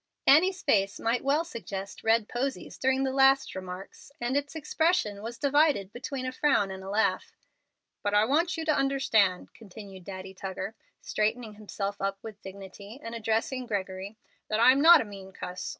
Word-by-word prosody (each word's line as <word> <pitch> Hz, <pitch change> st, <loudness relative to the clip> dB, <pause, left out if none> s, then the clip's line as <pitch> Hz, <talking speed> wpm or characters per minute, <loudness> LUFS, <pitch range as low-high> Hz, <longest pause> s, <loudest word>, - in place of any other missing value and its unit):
Annie's 370 Hz, +6 st, +5 dB
face 200 Hz, -7 st, +2 dB
might 230 Hz, +2 st, 0 dB
well 290 Hz, +4 st, +2 dB
suggest 200 Hz, -, -7 dB
"red 225 Hz, -1 st, +3 dB
posies" 265 Hz, +2 st, -4 dB
during 265 Hz, 0 st, +2 dB
the 265 Hz, -, 0 dB
last 270 Hz, 0 st, +4 dB
remarks, 185 Hz, +6 st, -9 dB
and 240 Hz, +2 st, -1 dB
its 285 Hz, +2 st, -2 dB
expression 315 Hz, -, 0 dB
was 230 Hz, +2 st, -6 dB
divided 280 Hz, -7 st, +2 dB
between 255 Hz, +1 st, -5 dB
a 255 Hz, -, -2 dB
frown 255 Hz, -8 st, +2 dB
and 190 Hz, 0 st, -8 dB
a 190 Hz, -, -7 dB
laugh. 200 Hz, -2 st, 0 dB, 0.6 s
"But 205 Hz, 0 st, 0 dB
I 210 Hz, +1 st, +5 dB
want 330 Hz, +8 st, +1 dB
you 325 Hz, -, -3 dB
to 310 Hz, -, +3 dB
understand," 230 Hz, -9 st, +1 dB
continued 200 Hz, -3 st, -12 dB
Daddy 190 Hz, 0 st, -8 dB
Tuggar, 190 Hz, +2 st, -5 dB, 0.3 s
straightening 220 Hz, +1 st, -1 dB
himself 205 Hz, -1 st, -5 dB
up 195 Hz, 0 st, -1 dB
with 215 Hz, -2 st, -9 dB
dignity, 200 Hz, +4 st, -10 dB
and 230 Hz, -, -6 dB
addressing 230 Hz, +3 st, -1 dB
Gregory, 195 Hz, -1 st, -4 dB, 0.3 s
"that 215 Hz, -, -1 dB
I'm 255 Hz, +4 st, +6 dB
not 335 Hz, +1 st, +9 dB
a -, -, -4 dB
mean 195 Hz, -2 st, -11 dB
cuss. 180 Hz, 0 st, -6 dB
220 Hz, 170 wpm, -28 LUFS, 195-270 Hz, 0.6 s, not